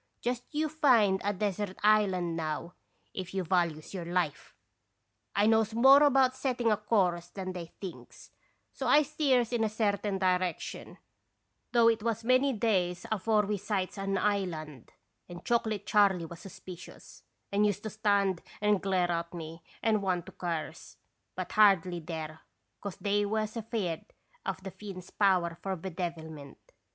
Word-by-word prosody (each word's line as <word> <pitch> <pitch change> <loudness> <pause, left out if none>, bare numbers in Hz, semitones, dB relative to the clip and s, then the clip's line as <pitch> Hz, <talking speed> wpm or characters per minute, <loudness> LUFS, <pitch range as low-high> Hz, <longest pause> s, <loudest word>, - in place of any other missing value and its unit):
Just 245 0 -2
you 310 +1 0
find 245 - +3
a 205 - +1
desert 200 -1 -2
island 190 -5 +3
now, 160 +1 -3 0.4
if 185 0 -6
you 190 - 0
values 170 -3 0
your 185 -3 -4
life! 175 -3 -2 0.2
' - - -50
" - - -46
I 205 - +4
knows 220 0 +3
more 270 +4 +8
about 270 -3 +4
setting 250 -3 0
a 210 - +3
course 185 -5 +1
than 185 0 -6
they 175 -2 -6
thinks, 190 -3 -10 0.4
so 265 - -4
I 295 +5 +6
steers 270 -5 +1
in 235 -2 +1
a 220 - +1
certain 205 -2 0
direction, 185 -2 -1 0.7
though 235 -1 +5
it 225 -1 +3
was 230 0 -1
many 255 +3 +3
days 190 -6 0
afore 215 0 +2
we 210 +1 -1
sights 195 -2 -2
an 195 0 -1
island; 170 - -2 0.4
and 175 0 -10
Chocolate 220 -4 0
Charley 195 -4 +3
was 165 +1 -10
suspicious, 185 -1 -11 0.3
and 200 +1 +2
used 205 -1 -2
to 215 - -4
stand 200 -4 +1 0.2
and 210 -2 +2
glare 185 -2 +1
at 170 +1 -3
me 165 0 -7 0.2
and 220 -2 +2
want 185 -3 -1
to - - -10
curse, 170 -3 -5 0.4
but 185 -1 -5
hardly 190 -5 +4
dare, 160 -1 -6 0.4
'cause 200 -3 -5
they 205 0 +1
was 215 +1 -1
afeard 215 -7 -3 0.4
of 190 -1 -3
the 190 - -6
Finn's 190 -3 -9
power 180 -4 +2
for 195 -1 -2
bedevilment. 160 -5 -6
195 Hz, 160 wpm, -30 LUFS, 175-220 Hz, 0.7 s, more